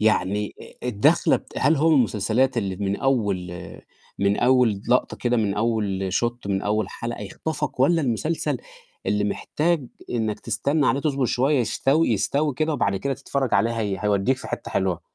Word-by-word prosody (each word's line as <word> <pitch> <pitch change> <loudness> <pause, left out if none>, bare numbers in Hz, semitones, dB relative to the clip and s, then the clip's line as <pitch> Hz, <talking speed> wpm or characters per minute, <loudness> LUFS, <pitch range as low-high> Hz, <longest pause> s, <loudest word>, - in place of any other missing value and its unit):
يعني 105 -1 +1 0.3
آآ 125 - -2
الدَخلة 105 -4 +3
بت - - -14
هل 155 +3 +3
هو 155 +4 +3
من 155 - +5
المسلسلات 120 +2 +2
اللي 95 -5 -1
من 100 0 -1
أول 100 -10 0 0.7
من 100 +1 +2
أول 125 -5 +3
لقطة 125 +1 +2
كده، 120 0 0
من 105 -4 +1
أول 105 -4 -1
shot، 120 +2 -1
من 95 0 -1
أول 105 -1 0
حلقة 115 +2 -6
يخطفك 150 +6 -4
والّا 165 +5 +4
المسلسل 140 +6 -1 0.5
اللي 105 0 +1
محتاج 155 +7 -1 0.2
إنّك 110 -3 -1
تستنى 145 0 0
عليه 135 - +2
تصبر 140 -3 0
شوية 135 +4 +2
يستوي 135 +5 +2
يستوي 140 +7 +1
كده 155 +3 0
وبعد 100 - 0
كده 135 +8 -2
تتفرّج 135 -1 -2
عليه 115 - +3
هي 100 -3 -1
هيودّيك 105 +5 +1
في - - -9
حتّة - - -5
حلوة؟ 95 -3 0
120 Hz, 170 wpm, -24 LUFS, 100-135 Hz, 0.7 s, من